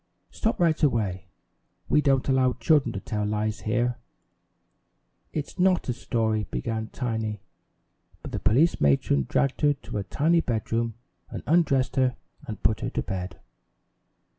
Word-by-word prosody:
"Stop 220 - -1
right 165 -3 +2
away! 100 - 0 0.6
We 150 - +4
don't 135 -2 +2
allow 130 -2 +3
children 150 -7 +2
to 95 - -3
tell 105 +1 -3
lies 105 +1 -1
here!" 120 +2 0 1.3
"It's 155 +4 -5
not 185 0 +3
a - - +2
story," 110 -3 -1
began 110 - -3
Tiny, 110 -4 -3 0.8
but - - -7
the - - -3
police 135 - +3
matron 70 -1 +2
dragged 135 -1 +1
her 145 -1 +4
to 115 - -6
a - - -2
tiny 165 - +2
bedroom, 115 -2 -1 0.3
and - - -6
undressed 140 -6 +2
her 130 -2 +3 0.3
and 105 - -7
put 105 +3 +2
her - - -2
to - - -2
bed. 90 -1 -5
115 Hz, 145 wpm, -26 LUFS, 105-140 Hz, 1.3 s, We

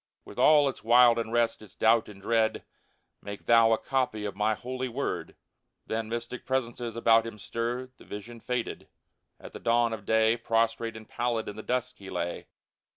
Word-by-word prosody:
With - - -10
all 150 -2 +6
its 135 - -4
wild 120 0 +6
unrest, 115 0 0
its 105 -4 -15
doubt 115 0 +3
and 100 -2 -12
dread: 110 +2 +1 0.3
*' - - -46
Make 100 0 -8
thou 115 -1 +6
a 110 - +4
copy 125 -6 -1
of 100 - -4
My 105 +2 +1
Holy 130 +3 -4
Word! 115 - -4 0.3
" - - -53
Then 110 0 -3
mystic 120 +2 -5
presences 120 -3 -2
about 115 -1 +4
him 115 - -8
stirred; 120 +4 -4
The - - -15
vision 115 +3 -8
faded. 125 0 -4 0.5
At - - -11
the - - -7
dawn 115 0 +2
of 105 -3 -7
day 110 +1 +3
Prostrate 115 0 0
and 110 - -12
pallid 120 -2 -2
in 105 - -6
the 110 - -6
dusk 125 +2 -2
he 95 -1 -10
lay. 85 -1 -4
115 Hz, 190 wpm, -28 LUFS, 110-120 Hz, 0.5 s, all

